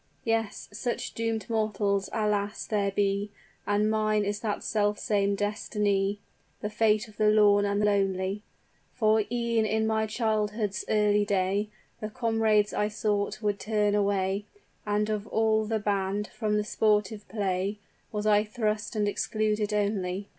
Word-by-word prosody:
"Yes; 225 Hz, -2 st, -1 dB
such 240 Hz, +3 st, -3 dB
doomed 225 Hz, -2 st, -2 dB
mortals, 205 Hz, -3 st, 0 dB
alas! 210 Hz, -2 st, -1 dB
there 205 Hz, -2 st, 0 dB
be 200 Hz, +1 st, 0 dB, 0.4 s
And 205 Hz, +1 st, +2 dB
mine 215 Hz, -1 st, +1 dB
is 205 Hz, +1 st, -2 dB
that 210 Hz, -2 st, -3 dB
self 210 Hz, -1 st, +1 dB
same 200 Hz, -1 st, +1 dB
destiny; 205 Hz, -1 st, 0 dB, 0.4 s
The 210 Hz, -, -3 dB
fate 215 Hz, 0 st, +2 dB
of 215 Hz, -, -17 dB
the 215 Hz, -1 st, +4 dB
lorn 205 Hz, -1 st, +5 dB
and 200 Hz, +1 st, +1 dB
lonely; 195 Hz, -1 st, 0 dB, 0.5 s
For 220 Hz, -2 st, +3 dB
e'en 235 Hz, -2 st, +1 dB
in 220 Hz, +1 st, +1 dB
my 220 Hz, 0 st, +1 dB
childhood's 215 Hz, -3 st, -1 dB
early 210 Hz, -1 st, +3 dB
day, 200 Hz, +1 st, 0 dB, 0.3 s
The 215 Hz, -, -4 dB
comrades 220 Hz, -2 st, +1 dB
I 210 Hz, -, +1 dB
sought 210 Hz, 0 st, -1 dB
would 205 Hz, -1 st, 0 dB
turn 210 Hz, -1 st, +1 dB
away; 200 Hz, -1 st, +1 dB, 0.4 s
And 210 Hz, 0 st, +1 dB
of 210 Hz, 0 st, -3 dB
all 220 Hz, -1 st, +2 dB
the 220 Hz, +1 st, 0 dB
band, 205 Hz, 0 st, -1 dB
from 210 Hz, -2 st, -1 dB
the 210 Hz, -, +1 dB
sportive 210 Hz, -1 st, 0 dB
play 195 Hz, 0 st, -1 dB, 0.3 s
Was 210 Hz, -1 st, -3 dB
I 210 Hz, -1 st, +4 dB
thrust 215 Hz, 0 st, -2 dB
and 210 Hz, -1 st, +1 dB
excluded 215 Hz, +1 st, 0 dB
only. 200 Hz, -2 st, -1 dB
210 Hz, 145 wpm, -28 LUFS, 205-215 Hz, 0.5 s, lorn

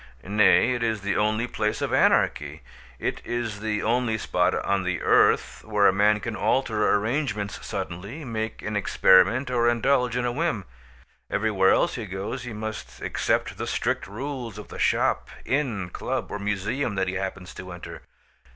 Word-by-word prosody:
Nay, 105 Hz, +5 st, +4 dB
it 120 Hz, -, -3 dB
is 110 Hz, -3 st, 0 dB
the 100 Hz, 0 st, -1 dB
only 110 Hz, +2 st, +1 dB
place 105 Hz, -3 st, -2 dB
of -, -, -2 dB
anarchy. -, -, +2 dB, 0.3 s
It -, -, -3 dB
is 120 Hz, -4 st, -3 dB
the 105 Hz, 0 st, -2 dB
only 115 Hz, 0 st, +1 dB
spot -, -, +1 dB
on 100 Hz, 0 st, 0 dB
the 90 Hz, -1 st, -2 dB
earth -, -, +3 dB
where 105 Hz, -2 st, +2 dB
a 95 Hz, -, +6 dB
man 105 Hz, +2 st, +3 dB
can 115 Hz, 0 st, -4 dB
alter 110 Hz, -5 st, +1 dB
arrangements 105 Hz, -2 st, -2 dB
suddenly, 100 Hz, -, -5 dB
make 110 Hz, -2 st, -4 dB
an 105 Hz, 0 st, -3 dB
experiment 105 Hz, +5 st, +4 dB
or 120 Hz, -1 st, +3 dB
indulge 125 Hz, +1 st, +2 dB
in 125 Hz, -, 0 dB
a 120 Hz, -, 0 dB
whim. 135 Hz, -, -1 dB, 0.6 s
Everywhere 105 Hz, -3 st, +2 dB
else -, -, +3 dB
he 115 Hz, -3 st, -5 dB
goes 100 Hz, +7 st, -5 dB
he 125 Hz, -, -6 dB
must 110 Hz, 0 st, -6 dB
accept -, -, -1 dB
the -, -, -3 dB
strict -, -, -1 dB
rules 120 Hz, 0 st, -5 dB
of 105 Hz, -, -9 dB
the -, -, -9 dB
shop, -, -, +1 dB, 0.2 s
inn, 115 Hz, -11 st, -1 dB
club, -, -, -3 dB
or 105 Hz, -, -4 dB
museum 105 Hz, +4 st, -2 dB
that 95 Hz, -1 st, 0 dB
he 90 Hz, -, -2 dB
happens 95 Hz, -2 st, -5 dB
to 90 Hz, 0 st, -9 dB
enter. 90 Hz, -, -9 dB
105 Hz, 170 wpm, -25 LUFS, 100-120 Hz, 0.6 s, a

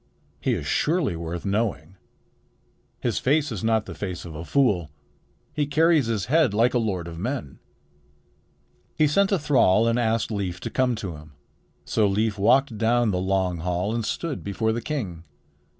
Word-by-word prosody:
"He -, -, 0 dB
is -, -, -5 dB
surely 160 Hz, -, +1 dB
worth 85 Hz, +2 st, -5 dB
knowing. 100 Hz, -4 st, -1 dB, 1.1 s
His -, -, 0 dB
face 145 Hz, +1 st, +1 dB
is 105 Hz, -5 st, -5 dB
not 110 Hz, -1 st, +2 dB
the -, -, -7 dB
face 90 Hz, -3 st, -5 dB
of 85 Hz, -, -8 dB
a 80 Hz, +2 st, -6 dB
fool. 100 Hz, -, +1 dB, 0.6 s
He 150 Hz, -1 st, 0 dB
carries 155 Hz, -2 st, +3 dB
his 110 Hz, -4 st, -1 dB
head 145 Hz, -5 st, +2 dB
like 115 Hz, +3 st, +3 dB
a 125 Hz, -, +2 dB
lord 95 Hz, -7 st, -2 dB
of 85 Hz, -1 st, -8 dB
men." 120 Hz, -, -4 dB, 1.4 s
He 155 Hz, -, +3 dB
sent 195 Hz, +7 st, +2 dB
a 195 Hz, -, +3 dB
thrall 125 Hz, -, +3 dB
and 115 Hz, +1 st, +2 dB
asked 115 Hz, -1 st, 0 dB
Leif 95 Hz, -4 st, -3 dB
to -, -, -5 dB
come 130 Hz, -2 st, +1 dB
to 95 Hz, -8 st, -6 dB
him. 75 Hz, 0 st, -14 dB, 0.5 s
So 110 Hz, -2 st, +2 dB
Leif 105 Hz, +1 st, 0 dB
walked 120 Hz, +2 st, +3 dB
down 115 Hz, 0 st, +2 dB
the 90 Hz, -, -1 dB
long 95 Hz, -2 st, 0 dB
hall 90 Hz, +5 st, -1 dB
and 115 Hz, -1 st, -1 dB
stood 145 Hz, +7 st, -3 dB
before 110 Hz, +3 st, -1 dB
the 115 Hz, +1 st, -2 dB
king. 105 Hz, -, -4 dB
110 Hz, 175 wpm, -24 LUFS, 95-130 Hz, 1.4 s, carries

